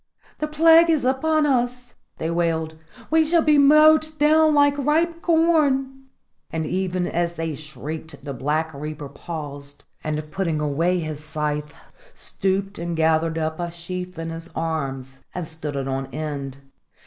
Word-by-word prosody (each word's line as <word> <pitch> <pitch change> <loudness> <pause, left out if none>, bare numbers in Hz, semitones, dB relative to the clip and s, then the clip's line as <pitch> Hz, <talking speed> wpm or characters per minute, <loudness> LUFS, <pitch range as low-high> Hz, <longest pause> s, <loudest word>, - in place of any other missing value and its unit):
"The 305 - -1
plague 325 +2 +6
is 310 -6 +2
upon 305 +4 +2
us!" 250 -2 0 0.2
they 160 - -2
wailed. 165 -2 -1 0.4
"We 320 0 +5
shall 325 +1 +3
be 300 -1 +5
mowed 305 +2 +6
down 310 +1 +4
like 285 0 +4
ripe 330 +4 +1
corn!" 285 -6 +2 0.4
And 160 -1 -3
even 185 +1 -1
as 170 0 -1
they 165 -1 -3
shrieked 155 +1 -8
the 140 -1 -5
Black 150 +5 -1
Reaper 150 0 -6
paused, 145 -2 -8 0.2
and, 155 0 -3
putting 165 -3 -1
away 160 +5 +1
his 155 -2 -5
scythe, 150 -1 -3 0.4
stooped 195 +1 -2
and 170 -1 -3
gathered 160 0 +2
up 160 0 -2
a 175 0 -2
sheaf 180 +1 -6
in 165 0 -4
his 165 +1 -7
arms 135 -5 -3 0.2
and 180 -2 -3
stood 155 -2 -5
it 135 -1 -2
on 135 0 -2
end. 140 -2 -5
165 Hz, 150 wpm, -23 LUFS, -, 0.4 s, plague